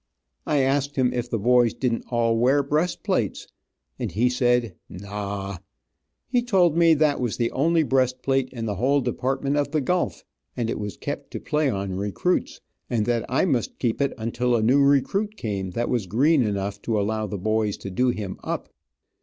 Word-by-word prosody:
I 150 -2 +2
asked 140 +2 0
him 130 -2 +2
if 120 0 -3
the 115 - 0
boys 120 +1 +3
didn't 120 -3 -1
all 115 -1 +2
wear 130 +5 +3
breast 155 +5 -1
plates, - - -1 0.5
and - - -3
he 120 +5 +2
said 125 -3 +1 0.2
"naw!" 100 0 -5 0.7
He 245 -1 +2
told 190 -9 +3
me 165 -1 +5
that 150 -2 +2
was 120 -3 -1
the 115 -1 0
only 160 +4 +2
breast 130 -2 +1
plate 135 -1 +1
in 115 -3 -5
the 105 -3 -3
whole 135 +6 +2
Department 135 +3 -1
of 145 -1 +1
the 155 +1 0
Gulf, 180 +6 -1 0.3
and 115 -2 -1
it - - -3
was 105 -1 -5
kept - - -5
to - - -3
play 150 -1 0
on 100 -4 -3
recruits, 100 - -1 0.3
and 110 -3 0
that 120 -1 0
I 130 +8 +2
must 130 - -1
keep 120 +1 -1
it 140 - 0
until 120 +2 0
a 110 - +1
new 130 +5 +4
recruit 195 +10 +2
came 100 -4 -3
that 120 +3 -1
was 120 -6 -1
green 140 - +3
enough 100 -2 -2
to 110 -2 0
allow 110 +1 -1
the 100 +1 -4
boys 110 +1 0
to 100 - -7
do 125 +7 +2
him 105 -5 -4
up. - - -4
125 Hz, 195 wpm, -24 LUFS, 110-140 Hz, 0.7 s, me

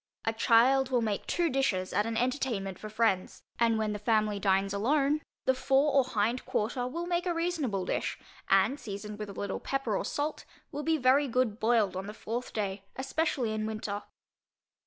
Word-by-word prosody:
A 225 - +1
child 250 +4 +4
will 245 -3 +2
make 210 -2 -2
two 345 -1 +1
dishes 245 - 0
at 205 +3 +1
an 225 -1 -2
entertainment 235 -7 -1
for 215 - -7
friends, 215 -4 0 0.2
and 230 -1 +3
when 215 -1 0
the 210 - -4
family 215 -1 +1
dines 195 0 +2
alone, 280 +8 +2 0.2
the 260 - +4
fore 270 +2 +2
or 275 -1 +5
hind 235 0 0
quarter 245 +3 -1
will 335 +7 -4
make 350 +1 -1
a 345 - 0
reasonable 305 - -1
dish, - - -2 0.3
and 280 +3 +4
seasoned 210 -1 -7
with 210 -1 -5
a - - -7
little 200 0 -3
pepper 270 -6 -1
or - - -1
salt, 295 +1 -2 0.3
will 295 -1 -4
be 320 +1 +1
very 275 +2 +4
good 240 -3 0
boiled 220 -4 +2
on 190 +2 -4
the 210 - -7
fourth 235 +3 -4
day, 200 -2 -2
especially 270 -4 -1
in 215 0 -2
winter. 215 -2 -4
230 Hz, 190 wpm, -30 LUFS, 210-270 Hz, 0.3 s, or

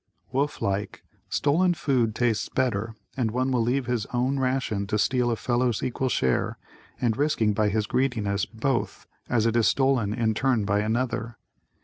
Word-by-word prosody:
Wolf 140 +3 -1
like, 100 +1 -2 0.3
stolen 175 +5 +2
food 125 -8 +1
tastes 115 -2 0
better 110 -4 -1 0.2
and 125 -4 0
one 130 +4 0
will 125 -2 +2
leave 125 +3 0
his 120 -3 -1
own 130 +3 0
ration 130 -6 -1
to 105 - 0
steal 125 +2 +2
a 115 - +1
fellow's 120 0 0
equal 130 +1 -1
share 65 - 0 0.4
and 115 -3 +1
risking 120 -6 +1
by 105 +1 +2
his 105 +1 0
greediness 105 -5 0
both, 120 +2 -2 0.2
as 115 -2 +2
it 115 0 +1
is 115 -2 +4
stolen 130 -6 +2
in 110 0 +1
turn 120 -2 +1
by 100 0 +1
another. 115 +1 -1
120 Hz, 165 wpm, -26 LUFS, 110-130 Hz, 0.4 s, is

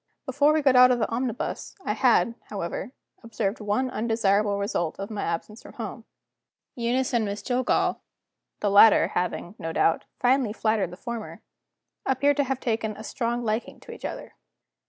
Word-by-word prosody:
Before 285 +2 +3
we 310 -1 +1
got 270 -2 +4
out 250 0 +8
of 250 - +3
the 225 - 0
omnibus 240 0 -3
I - - 0
had, 235 - +3 0.2
however, 195 +3 -4 0.3
observed 230 -3 -3
one 210 +5 0
undesirable 210 -3 +1
result 200 -5 -2
of 195 +2 -6
my 210 -2 -3
absence 170 +7 -4
from - - -13
home. - - -7 0.7
Eunice 245 +2 -1
and 235 -2 +2
Miss 205 0 -4
Jillgall 255 0 +1 0.6
the 205 - +1
latter 205 +2 +7
having, 180 0 -2
no 165 - -4
doubt, 165 0 +1
finely 250 -3 +2
flattered 215 -5 0
the 180 - -10
former 235 0 -7 0.6
appeared 280 +2 +2
to 285 - +2
have 265 0 -2
taken 220 -3 -2
a 215 - -8
strong 240 +1 -2
liking 220 +2 -2
to - - -11
each - - -11
other. - - -6
225 Hz, 170 wpm, -26 LUFS, 205-250 Hz, 0.7 s, out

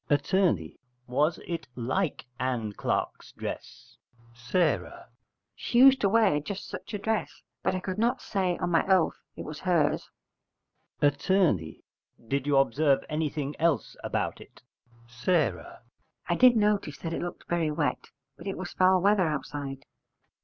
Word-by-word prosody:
Att. 145 -1 +1 0.7
Was 145 +6 +1
it 170 -4 -4
like 130 +8 -2
Ann 120 -4 -1
Clark's - - -3
dress? - - -8 0.5
S. - - -4 1.0
She 240 - -2
used 265 +1 +7
to 200 - +3
wear 205 -8 +4
just 195 +7 -6
such 225 - -7
a - - -1
dress: 220 +1 -2 0.2
but - - 0
I - - -1
could 185 +2 -4
not 240 +3 +2
say 185 -6 -1
on 175 - -2
my 165 - +4
oath 190 -3 +2
it - - -7
was 150 -1 -7
hers. 160 -5 +1 0.9
Att. 145 -1 +2
Did 140 - -1
you 145 -1 +3
observe 135 +1 +3
anything 150 -2 -2
else 165 -2 +1
about - - -2
it? - - -16 0.4
S. 120 0 -15
I 155 - -2
did 250 +2 +6
notice 205 -8 +1
that 165 -1 -5
it - - -2
looked 175 0 -6
very 170 -2 0
wet: 150 0 -1 0.3
but - - -10
it 195 - -3
was 185 -1 -6
foul 185 -1 +4
weather 200 -3 +4
outside. 140 -2 -4
165 Hz, 145 wpm, -28 LUFS, 140-190 Hz, 1.0 s, used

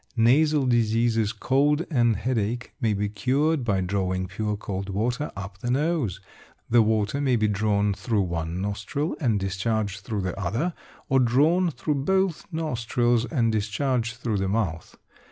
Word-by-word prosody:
Nasal 140 +5 +4
diseases, 115 -2 +2
cold 145 - +1
and 120 -5 +3
headache, 120 +1 -2
may 110 -3 +2
be 105 +1 -1
cured 130 +8 +1
by 100 -5 +1
drawing 95 0 -1
pure 105 +2 -3
cold 100 -1 -5
water 120 +9 -1
up 100 0 -7
the 120 - -4
nose. 135 - 0 0.5
The 120 0 +6
water 110 +4 +1
may 130 -3 +2
be 110 -2 +2
drawn 105 0 +1
through 105 0 0
one 85 -1 -3
nostril 105 - -2
and 115 -8 +1
discharged 100 +2 -1
through 100 +1 -3
the 95 0 -3
other, 115 - -1 0.3
or 135 - +3
drawn 150 +9 +3
through 140 0 -2
both 190 0 0
nostrils 120 -6 0
and 120 -6 +1
discharged 115 +2 -1
through 115 -4 -1
the 95 -1 -1
mouth. 95 -6 -2
115 Hz, 155 wpm, -25 LUFS, 100-130 Hz, 0.5 s, The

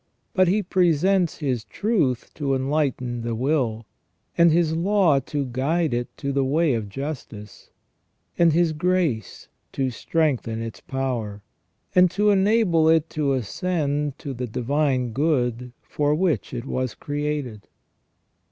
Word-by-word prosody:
But 185 -1 +4
He 205 +4 +2
presents 180 0 +2
His 130 -7 -2
truth 155 - -1
to 140 -3 -1
enlighten 130 -3 -1
the 115 0 -3
will, 120 -4 0 0.5
and 170 -1 +5
His 160 -1 +2
law 175 -4 +3
to 140 +1 -3
guide 140 +5 0
it 120 0 -2
to 140 -1 -3
the 140 0 +1
way 150 +2 +2
of 110 -3 -3
justice, 120 -5 -7 0.7
and 170 -1 +4
His 165 0 +2
grace 165 - -1 0.3
to 130 -1 -1
strengthen 130 -4 -1
its 115 -1 -6
power, 120 -6 -4 0.5
and 180 0 +6
to 210 +3 +2
enable 190 -5 +3
it 160 0 +2
to 145 -3 0
ascend 145 - -2
to 140 - -6
the 125 0 -4
divine 130 +1 0
good 125 -4 0
for 150 0 0
which 165 - 0
it 120 - -5
was 130 -2 -3
created. 145 -7 -4
145 Hz, 135 wpm, -23 LUFS, 125-165 Hz, 0.7 s, and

